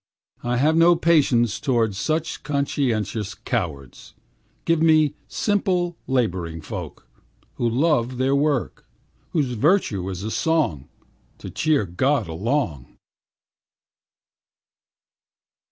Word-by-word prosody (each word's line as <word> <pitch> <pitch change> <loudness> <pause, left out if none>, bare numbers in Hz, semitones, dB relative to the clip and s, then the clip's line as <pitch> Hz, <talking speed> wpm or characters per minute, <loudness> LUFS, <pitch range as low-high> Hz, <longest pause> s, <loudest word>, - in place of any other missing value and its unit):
I 120 0 -1
have 150 +5 +3
no 170 +1 +6
patience 140 - +2
towards 115 -7 +1
Such 155 +11 -2
conscientious 115 -8 -1
cowards. 70 -7 -5 0.5
Give 165 -1 +2
me 155 -2 +4
simple 185 -4 0
laboring 90 -11 -1
folk, - - -7 0.5
Who 120 - +1
love 130 -1 +1
their 130 +2 +2
work, 145 -2 -1 0.4
Whose 145 -6 0
virtue 120 - +1
is 95 +4 -4
song 140 - 0 0.5
To - - -9
cheer 155 -8 +1
God 120 +6 0
along. 85 - -2
130 Hz, 95 wpm, -23 LUFS, 105-155 Hz, 0.5 s, no